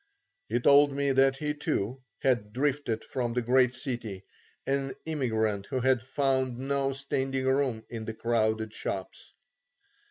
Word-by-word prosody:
He - - +1
told 145 +3 +6
me 140 0 0
that 135 0 +4
he 150 +1 -2
too, 135 - -2 0.2
had 120 -6 +1
drifted 135 -3 0
from 120 -3 -2
the 125 0 0
great 125 +1 +3
city, 120 -7 -4 0.4
an 135 0 -1
immigrant 110 -9 -1
who 130 - -1
had 130 -1 +3
found 130 -1 0
no 135 +1 0
standing 135 -1 -2
room 130 -4 +1
in 115 -2 -6
the 110 - -5
crowded 110 -1 0
shops. - - -5
130 Hz, 145 wpm, -29 LUFS, 115-135 Hz, 0.4 s, told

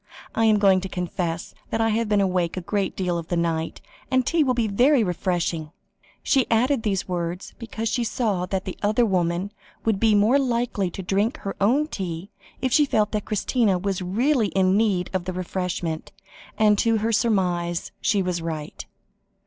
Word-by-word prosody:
"I 225 - +2
am 215 -1 +5
going 195 -2 +4
to 190 - -5
confess 175 -2 -3 0.2
that 225 - -1
I 225 0 +2
have 225 0 0
been 205 -1 +3
awake 180 -2 0
a - - -2
great 195 +2 -2
deal 180 -2 -1
of 165 - -8
the 175 - -1
night, 165 -1 -1 0.3
and 260 -1 +2
tea 335 +2 +2
will 255 -3 +1
be 235 -2 +1
very 245 +5 +4
refreshing." 175 -4 -1 0.5
She 270 -5 +2
added 245 +3 +2
these 195 -4 -1
words, 175 0 -4
because 225 -1 -4
she 240 +1 0
saw 210 -6 -1
that 190 0 -2
the 185 - -5
other 215 +4 +3
woman 180 -1 0 0.3
would 220 -3 +1
be 220 -1 +4
more 220 +7 +4
likely 235 -7 0
to 190 - -7
drink 205 +9 0
her 195 - -5
own 255 +9 +3
tea, 185 - -5 0.3
if 260 -2 +1
she 295 -1 +5
felt 210 -4 +1
that 210 -2 -2
Christina 215 -1 +1
was 195 0 -2
really 225 +6 +1
in 190 -1 +2
need 200 -5 +1
of 185 -2 -1
the 185 - -3
refreshment, 180 -3 -3 0.5
and 210 -1 +4
her 225 -1 +1
surmise 180 -6 0 0.2
was 180 -3 0
right. 160 -2 -5
200 Hz, 180 wpm, -24 LUFS, 180-225 Hz, 0.5 s, am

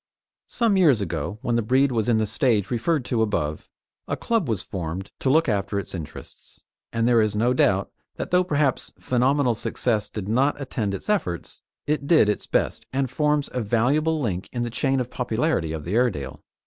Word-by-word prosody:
Some 225 -5 +1
years 150 - +5
ago, 85 +1 -3
when 120 -2 +1
the - - +2
breed 130 +5 +2
was 115 -2 0
in 115 - +4
the 110 - +1
stage 110 -1 +1
referred 130 +3 0
to 120 -3 0
above, 80 -8 -1 0.4
a - - -2
club 225 - 0
was 105 -4 -1
formed 95 +1 -5
to 135 - 0
look 160 +4 +4
after 100 -1 -1
its 100 - -5
interests, 80 -5 -10 0.3
and 115 0 +1
there 120 -2 +5
is 105 -1 0
no 120 +4 +2
doubt 95 -5 +2 0.2
that - - -5
though 180 0 +4
perhaps 150 -6 0
phenomenal 130 +1 +2
success 110 -1 -1
did 100 -3 -6
not 135 +7 +1
attend 110 -7 -2
its - - -8
efforts, 135 - -2 0.2
it 145 -1 -1
did 155 -11 +5
its 105 - -2
best, - - -1
and 130 -1 -1
forms 150 +1 +1
a 125 - -1
valuable 135 +9 +1
link 95 -9 -3
in 120 -1 -2
the 120 - -3
chain 135 +2 +1
of 125 -1 -3
popularity 120 - 0
of 80 -2 -5
the 90 - -3
Airedale. 105 - 0
120 Hz, 195 wpm, -24 LUFS, 105-140 Hz, 0.4 s, years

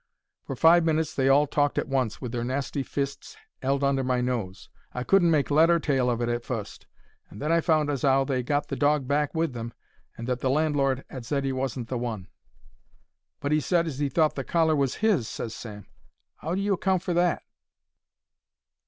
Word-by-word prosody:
For 135 - -6
five 165 +4 +5
minutes 160 -1 0
they 135 -1 +1
all 145 +2 +5
talked 145 0 0
at - - 0
once, 130 -5 -1
with 125 -4 -5
their 120 -1 -3
nasty 135 +3 -2
fists 140 - -5 0.2
'eld 135 +1 0
under 140 -1 +2
my 125 -1 0
nose. 115 -7 -3 0.3
I 125 - -2
couldn't 185 +2 +4
make 150 -3 +1
lead 160 +3 +5
or 170 0 +4
tail 135 -5 +1
of 120 -1 -1
it 120 - 0
at 120 0 -2
fust, 115 -5 -6 0.4
and 105 - -12
then 150 +3 -1
I 165 0 +3
found 155 -3 +2
as 140 - -3
'ow 135 -1 +4
they 135 -2 -1
'ad 125 - -5
got 145 0 0
the - - -2
dog 145 -2 +1
back 145 +2 0
with 160 -4 0
them, 115 -1 -6 0.4
and 115 - -6
that 125 -1 -1
the 130 - 0
landlord 140 -2 +1
'ad 130 -3 -7
said 140 +3 -2
'e 135 - 0
wasn't 130 -2 -3
the 125 -1 -3
one. 110 -6 -5 1.1
"But 145 +1 0
'e 155 - +4
said 170 +2 +1
as 145 -4 -5
he 145 -1 0
thought 155 +3 +2
the 135 - -4
collar 160 0 +2
was 140 -2 0
his," 175 - +2
ses 115 - -5
Sam. 105 -4 -9 0.6
"'Ow 165 +3 -2
do 195 - -1
you 200 0 +1
account 190 -1 0
for 180 - -1
that?" 175 0 +1
140 Hz, 215 wpm, -26 LUFS, 125-155 Hz, 1.1 s, five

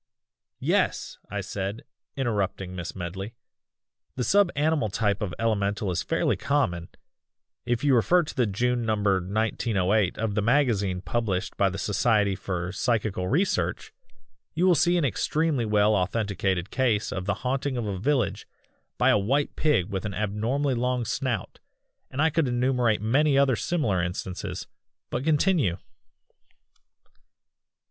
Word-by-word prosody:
"Yes!" - - 0
I - - -3
said, 100 +3 -4 0.3
interrupting 100 -7 -2
Miss 90 -2 -5
Medley, 95 +5 -6 0.8
"the 125 - -1
sub 200 +6 +4
animal 150 -5 +1
type 100 0 0
of 100 -4 -2
elemental 100 -3 0
is 85 -1 -1
fairly - - 0
common 85 -13 -1 0.8
if 120 +1 0
you 145 -2 +4
refer 170 +9 +4
to 150 - -7
the 125 -3 +2
June 120 +4 0
number 105 -3 +2
1908 100 0 0
of 110 -2 -1
the 105 - +1
magazine 105 -7 +1
published 100 -1 -2
by 100 - +2
the 95 - -5
Society 105 0 +2
for 90 -2 -4
Psychical 105 -4 -1
Research 180 - 0 0.6
you 175 +3 +2
will 185 - +6
see 175 +1 +3
an 165 - +2
extremely 150 0 0
well 105 0 +3
authenticated 95 -2 -1
case 115 -5 +1
of 95 -1 -4
the 105 - +1
haunting 135 +1 -1
of 120 - -2
a 100 -3 -3
village 125 -2 0 0.5
by - - +4
a 105 - +4
white 135 +9 0
pig 145 - +1
with 95 -2 -3
an 105 -2 -4
abnormally 115 +7 0
long 125 0 0
snout 120 -4 -3 0.5
and 140 +4 -1
I 160 - +3
could 160 -2 +1
enumerate 120 -3 +1
many 140 +5 +3
other 140 -3 +4
similar 110 - 0
instances. 90 +1 -4 0.5
But 125 - -2
continue!" 155 - +2
110 Hz, 140 wpm, -26 LUFS, 100-135 Hz, 0.8 s, will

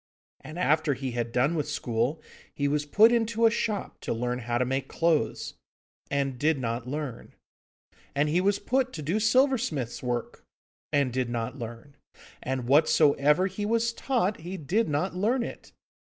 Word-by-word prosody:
And, 155 +4 -10
after 155 -4 +2
he 130 0 -4
had 120 -1 -3
done 130 +7 +2
with 150 -3 -2
school, 125 +2 -1 0.3
he 145 - 0
was 145 +1 0
put 215 +9 +6
into 230 -1 +2
a 225 - +6
shop 225 -3 -2
to - - -2
learn 125 +2 -2
how 120 0 -2
to 125 - +1
make 135 +1 -2
clothes, 165 -2 0 0.6
and 135 -3 -1
did 155 +1 +2
not 120 -1 -3
learn; 140 -3 -5 0.8
and 145 +2 +2
he 165 +4 +2
was 200 +1 +2
put 255 +5 0
to 155 - -6
do 170 +9 0
silversmith's 225 - +1
work, 120 -2 -3 0.5
and 140 -4 +1
did 130 -1 -1
not 120 +3 -3
learn; 120 +4 -8 0.4
and 130 -1 -3
whatsoever 150 +3 +4
he 195 +2 -4
was 230 +2 +1
taught, 230 -6 0
he 180 +4 -6
did 185 +7 0
not 155 +6 -1
learn 230 +7 +1
it. - - -8
150 Hz, 170 wpm, -27 LUFS, 130-200 Hz, 0.8 s, put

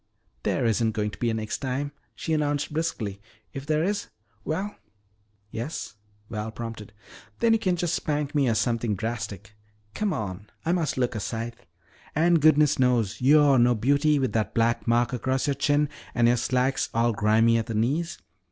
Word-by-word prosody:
"There - - 0
isn't 115 0 +2
going 105 -1 -1
to - - -12
be 120 - +1
any 110 -1 -2
next 110 - -4
time," 140 +2 -2 0.2
she 160 - -3
announced 145 -1 0
briskly. 115 -12 -2 0.3
"If 135 +1 -7
there 155 0 +2
is 205 +2 -1 0.4
well 195 +7 -3 0.4
" 105 - -42 0.3
"Yes?" 120 +8 -5 0.3
Val 105 0 -4
prompted. 115 -2 -7 0.5
"Then 230 -1 +3
you 225 - +3
can 185 -4 +1
just 175 -1 -1
spank 150 -4 -1
me 140 -4 +2
or 115 - +1
something 115 -2 0
drastic. 110 -1 -5 0.4
Come 210 -2 -1
on, 100 - -4 0.2
I 165 - +2
must 170 -6 0
look 125 -1 +1
a 110 - -3
sight. 115 +2 -4 0.6
And 165 +1 +4
goodness 150 -2 +5
knows, 120 -6 +1
you're 140 0 +6
no 120 0 +4
beauty 140 +6 +3
with 130 -2 0
that 110 -2 -1
black 115 +1 +1
mark 120 +2 +2
across 130 +1 0
your 140 - +1
chin 145 +2 +2 0.3
and 120 -1 +4
your 120 +1 +4
slacks 130 +3 0
all 115 +1 +3
grimy 110 +2 +3
at 110 - -4
the 115 - -3
knees. 145 +10 0
125 Hz, 180 wpm, -26 LUFS, 115-150 Hz, 0.6 s, you're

